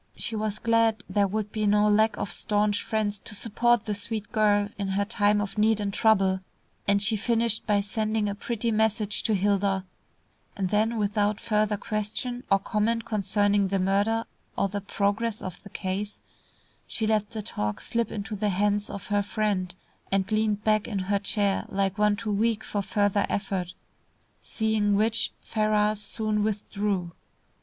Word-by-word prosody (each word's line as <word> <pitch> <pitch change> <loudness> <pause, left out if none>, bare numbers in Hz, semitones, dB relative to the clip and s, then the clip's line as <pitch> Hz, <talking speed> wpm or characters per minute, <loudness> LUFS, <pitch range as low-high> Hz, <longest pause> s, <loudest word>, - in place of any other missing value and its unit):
She 225 - -3
was 215 -1 -2
glad 230 -2 +2
there 205 -1 +2
would 210 +1 -3
be 215 -1 0
no 210 +1 +4
lack 215 +1 +3
of - - -3
staunch 205 -1 0
friends 210 -2 -1
to 210 - -7
support 235 +2 +2
the 210 - -1
sweet 210 +1 -3
girl 205 -1 +3
in 200 - -1
her 195 +1 0
time 205 -1 +2
of 205 +1 -3
need 215 0 +3
and 200 -1 -2
trouble, 195 -4 +3 0.5
and 200 0 +4
she 220 +2 +3
finished 230 +1 +1
by 205 -2 +3
sending 215 +1 -1
a 200 - -1
pretty 230 +2 -2
message 215 -1 +1
to 220 - +1
Hilda, 195 -1 +1 0.7
and 190 -2 -1
then 220 +2 +2
without 210 0 +1
further 210 -1 +1
question 220 +4 -3
or 195 - +5
comment 220 +3 -1
concerning 205 -2 +1
the 195 +1 0
murder 200 +4 +1 0.3
or - - +2
the 205 +1 -3
progress 205 +3 -1
of 180 -1 -7
the 200 - -12
case, 200 +2 -4 0.7
she 220 - -2
let 215 -1 +1
the 220 -2 -6
talk 105 - -3
slip 230 -2 -1
into 210 +1 -4
the 210 +1 0
hands 205 +2 +1
of 200 - -6
her 205 - +3
friend, 200 -3 -1 0.4
and 195 0 0
leaned 215 -1 +1
back 215 -1 +2
in 210 - -3
her 195 +1 0
chair 200 -1 +1
like 195 +1 -1
one 210 0 +4
too 220 0 -4
weak 220 +2 +1
for 205 - -2
further 205 +1 +1
effort, 190 -3 -2 0.7
seeing 220 -2 +1
which 220 +2 +2
Ferrars 215 -1 +1
soon 215 +1 -1
withdrew. 205 -3 -1
210 Hz, 170 wpm, -27 LUFS, 200-220 Hz, 0.7 s, or